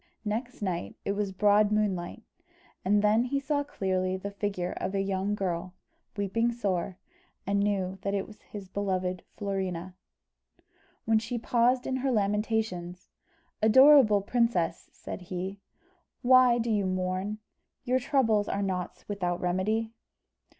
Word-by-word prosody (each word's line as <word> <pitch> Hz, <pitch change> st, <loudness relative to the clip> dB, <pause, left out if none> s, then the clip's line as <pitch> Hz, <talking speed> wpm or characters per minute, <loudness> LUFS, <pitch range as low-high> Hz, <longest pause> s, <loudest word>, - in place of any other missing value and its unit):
Next 225 Hz, +2 st, -3 dB
night, 170 Hz, -, -3 dB
it -, -, 0 dB
was 200 Hz, -1 st, -1 dB
broad 205 Hz, +2 st, +4 dB
moonlight, 210 Hz, -1 st, -1 dB, 0.6 s
and 205 Hz, +2 st, +3 dB
then 215 Hz, +3 st, +4 dB
he 275 Hz, +2 st, 0 dB
saw 285 Hz, +1 st, 0 dB
clearly 185 Hz, -7 st, -1 dB
the 200 Hz, +2 st, -6 dB
figure 200 Hz, -3 st, -3 dB
of 190 Hz, +2 st, -3 dB
a 195 Hz, -, +1 dB
young 195 Hz, +1 st, -1 dB
girl, 180 Hz, -2 st, -3 dB, 0.4 s
weeping 230 Hz, +4 st, +1 dB
sore, 190 Hz, -6 st, -2 dB, 0.5 s
and 200 Hz, +1 st, +1 dB
knew 195 Hz, -2 st, 0 dB
that 200 Hz, 0 st, -1 dB
it 195 Hz, -, -1 dB
was 215 Hz, -, -15 dB
his 200 Hz, -2 st, -9 dB
beloved 185 Hz, -2 st, -2 dB, 0.2 s
Florina. 190 Hz, -3 st, -3 dB, 1.1 s
When 220 Hz, 0 st, +4 dB
she 235 Hz, +2 st, -4 dB
paused 245 Hz, +2 st, +2 dB
in 260 Hz, -, -1 dB
her 265 Hz, +1 st, 0 dB
lamentations, 210 Hz, -4 st, -1 dB, 0.5 s
"Adorable 230 Hz, -2 st, +7 dB
princess," 230 Hz, -6 st, 0 dB
said -, -, -8 dB
he, 185 Hz, +2 st, -5 dB, 0.6 s
"why 255 Hz, -1 st, +6 dB
do 235 Hz, -1 st, -1 dB
you 205 Hz, -3 st, +1 dB
mourn? 185 Hz, +3 st, -2 dB, 0.5 s
Your 255 Hz, 0 st, +1 dB
troubles 230 Hz, -6 st, +2 dB
are 200 Hz, -, -1 dB
not 185 Hz, -2 st, -4 dB
without 180 Hz, -4 st, -2 dB
remedy." 215 Hz, +5 st, 0 dB
200 Hz, 135 wpm, -28 LUFS, 185-225 Hz, 1.1 s, Adorable